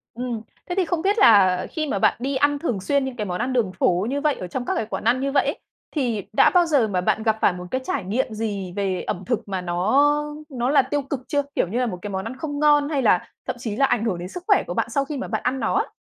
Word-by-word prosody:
Ừm. 240 -2 -3 0.3
Thế 355 - -2
thì 375 -2 +2
không 335 -1 -1
biết 400 +4 +1
là 190 - +5
khi 310 -2 -2
mà 200 - -1
bạn - - +3
đi 270 +2 -2
ăn 285 +1 +2
thường 235 - -2
xuyên 280 +5 +1
những 260 -2 -5
cái 210 -3 -3
món 180 0 -3
ăn 255 +1 -1
đường 220 -7 +1
phố 185 +3 +1
như 285 +1 -1
vậy 300 -2 +2
ở 180 - -6
trong 245 +7 -4
các - - -1
cái 225 - -1
quán - - -5
ăn 240 +3 +3
như 275 0 -1
vậy 280 - +3
ấy, - - -2 0.3
thì 240 - -1
đã - - +6
bao 355 -1 +5
giờ 280 -9 +3
mà 185 -3 -1
bạn 220 +4 0
gặp 220 -1 +2
phải 180 - +4
một 180 0 -7
cái 260 - -1
trải - - -2
nghiệm 220 +4 -1
gì 200 -5 -4
về 195 -2 -1
ẩm 180 - -4
thực 230 -3 -2
mà 190 -2 -3
nó 270 +13 +2 0.2
nó 250 -1 -1
là 285 -1 +5
tiêu 280 +2 -2
cực 270 -1 -4
chưa? 290 -1 +1
Kiểu - - +1
như 235 +7 -2
là 250 - +1
một 180 -6 -4
cái 205 - -5
món 190 +1 -3
ăn 255 +3 -6
không 290 -2 -4
ngon, 295 -1 +4
hay 285 -4 0
là 185 -6 +3 0.2
thậm - - -2
chí 220 -4 -4
là 275 - +3
ảnh 235 -3 0
hưởng 185 -6 -1
đến 180 +1 -6
sức 360 - -8
khỏe 405 - +4
của - - -3
bạn - - -1
sau 275 -1 0
khi 290 0 -5
mà - - -4
bạn - - -3
ăn 265 +1 0
nó - - 0
á. 425 +4 0
245 Hz, 305 wpm, -23 LUFS, 200-285 Hz, 0.3 s, đã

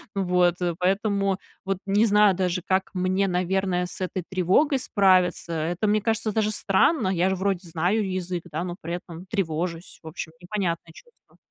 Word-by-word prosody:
Вот. 180 -2 +2 0.2
Поэтому 195 +1 +1 0.3
вот 195 0 -1
не 200 +3 +3
знаю 210 -1 +5
даже, 180 -1 -1
как 190 0 +1
мне, 185 +2 +1
наверное, 180 0 0
с 180 - -9
этой 185 0 -3
тревогой 190 - +2
справиться. 185 -6 +2
Это, 165 +5 -1
мне 215 0 +2
кажется, 220 0 0
даже 215 0 +1
странно. 215 - +2
Я 185 0 +2
же 190 - 0
вроде 190 -1 -1
знаю 185 +6 0
язык, 180 -2 -3
да, 160 +3 -2
но 175 -1 -4
при 170 +2 -3
этом 175 0 -9
тревожусь. 170 -3 -3
В 160 - -12
общем, 160 0 -6
непонятное 175 -4 -3
чувство. 480 - -20
185 Hz, 165 wpm, -25 LUFS, 175-200 Hz, 0.3 s, знаю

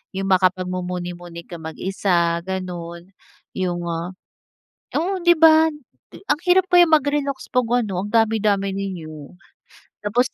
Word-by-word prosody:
'yung 195 0 -2
makapagmumuni-muni 180 -2 -1
kang 165 -2 -9
mag 160 - -8
isa, 175 -3 0
ganun, 175 -1 -6 0.4
'yung, 175 -2 -2
ah, 170 +2 -4 0.8
oo 370 +2 -2
'di 345 -1 +4
ba 320 0 +6 0.4
ang 295 -6 -2
hirap 370 +1 +4
kaya 355 -1 +7
mag-relaks 290 -3 0
'pag 250 -2 +1 0.2
ano, 190 -2 -3
ang 205 - -6
dami 225 -1 +2
dami 200 -2 +1
ninyo, 165 -7 -7 0.7
tapos. 245 +4 +2
190 Hz, 130 wpm, -21 LUFS, 175-270 Hz, 0.8 s, kaya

